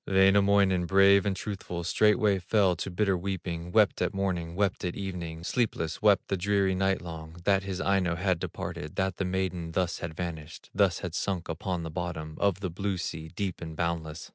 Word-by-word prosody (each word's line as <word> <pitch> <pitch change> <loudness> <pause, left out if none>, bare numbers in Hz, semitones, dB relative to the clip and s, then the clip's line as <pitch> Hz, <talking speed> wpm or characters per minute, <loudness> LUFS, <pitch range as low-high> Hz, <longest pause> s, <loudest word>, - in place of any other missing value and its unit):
Wainamoinen, 95 -1 +4
brave 100 +1 +5
and 100 - 0
truthful, 95 -3 -5
Straightway 105 +2 +3
fell 95 0 +2
to 85 - -4
bitter 95 +1 +1
weeping, 90 -2 -4
Wept 105 -1 +3
at - - 0
morning, 90 -4 -2
wept 100 -1 0
at 90 -1 -2
evening, 85 -4 -5
Sleepless, 90 -7 -1
wept 105 -2 +4
the 100 - 0
dreary 100 0 +2
night 95 0 +1
long, 80 -1 -8
That 100 +1 +3
his 95 -1 -4
Aino 95 -3 +1
had 90 0 0
departed, 75 -1 -5
That 95 -2 -1
the 95 - -1
maiden 90 -3 -2
thus 90 -1 0
had 80 -2 -5
vanished, 80 -2 -6
Thus 95 -4 +2
had 90 -4 -4
sunk 95 -2 -2
upon 85 +1 -3
the 80 - -5
bottom 80 -3 -4
Of 100 -1 +1
the 95 -3 -2
blue 95 +2 -2
sea, 80 -2 -4
deep 95 -2 -3
and 80 -2 -6
boundless. 80 -1 -3
95 Hz, 190 wpm, -28 LUFS, 85-100 Hz, -, brave